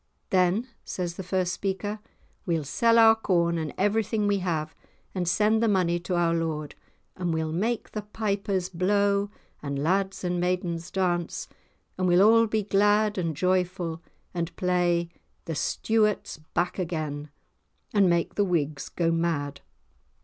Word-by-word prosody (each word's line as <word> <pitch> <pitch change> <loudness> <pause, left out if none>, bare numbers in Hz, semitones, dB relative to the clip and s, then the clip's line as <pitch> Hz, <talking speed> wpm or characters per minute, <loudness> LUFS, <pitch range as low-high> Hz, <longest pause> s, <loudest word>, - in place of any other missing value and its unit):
"Then," 185 +6 +2 0.2
says 175 -2 -4
the 180 - -6
first 185 0 -1
speaker, 205 +2 -3 0.5
"we'll 165 -3 0
sell 230 - +3
our 225 -1 +8
corn 170 -6 +1
and 155 -2 -3
everything 210 +1 +1
we 205 -1 +2
have 160 -4 -2 0.4
and 180 -2 -2
send 215 +5 +3
the 230 - +3
money 180 -4 +2
to 175 +1 -3
our 170 -1 +2
lord, 160 -3 -2 0.4
and 180 -2 -2
we'll 160 -1 -1
make 220 +8 -1
the 215 - -4
pipers 200 -3 -2
blow 200 +3 +1 0.3
and 140 -1 -3
lads 190 +7 0
and 180 -1 -1
maidens 175 -1 -1
dance, 175 -3 -1 0.5
and 185 - +2
we'll 180 +3 +6
all 230 +1 +5
be 215 0 0
glad 205 +1 +2
and 165 -4 -2
joyful 180 -2 0 0.3
and 170 -1 -3
play 175 -2 +1 0.4
'The 165 - -3
Stuarts 215 +6 0 0.2
back 175 +2 0
again,' 155 -4 -3 0.6
and 200 -3 +4
make 170 -1 +1
the 205 - +2
Whigs 155 -6 -1
go 165 -1 0
mad." 160 -4 -1
180 Hz, 150 wpm, -26 LUFS, 170-205 Hz, 0.6 s, our